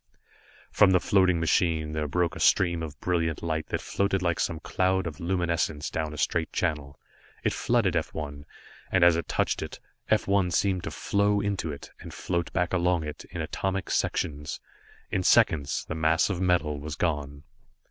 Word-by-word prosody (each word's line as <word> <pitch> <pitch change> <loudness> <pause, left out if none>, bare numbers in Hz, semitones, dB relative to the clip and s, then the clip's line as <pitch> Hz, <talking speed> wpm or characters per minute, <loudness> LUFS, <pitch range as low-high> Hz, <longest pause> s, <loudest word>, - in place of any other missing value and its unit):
From - - +5
the 90 - +5
floating 95 -3 +3
machine 80 -1 +1
there 75 -1 -1
broke 90 +4 0
a - - -7
stream 85 -3 +3
of 75 -5 -7
brilliant 85 -3 -1
light 80 -2 -2
that - - -2
floated 100 -1 0
like 85 -2 0
some 80 - -1
cloud 95 +2 0
of 80 -3 -6
luminescence 85 -4 -1
down 80 -1 -2
a 75 - -8
straight 80 +2 0
channel. 75 -5 -2 0.4
It - - +1
flooded - - +1
F - - -1
1, 70 -2 -6 0.5
and 95 -2 +3
as 85 -1 +7
it 85 - -3
touched - - 0
it, - - -6 0.3
F - - +2
1 100 -2 +2
seemed 95 +1 0
to - - -2
flow 100 0 +1
into 100 -6 -2
it, 70 - -9
and - - -9
float 85 -2 -2
back 90 -1 -1
along 90 -2 +2
it, 75 -1 -7
in 90 -1 -5
atomic 95 +4 -3
sections. 75 -1 -1 0.5
In 95 - +1
seconds 70 -5 +3
the - - -4
mass 80 +4 +2
of 90 -1 -3
metal 80 -5 +1
was 75 +1 -6
gone. 75 -4 -2
85 Hz, 180 wpm, -27 LUFS, 75-90 Hz, 0.5 s, as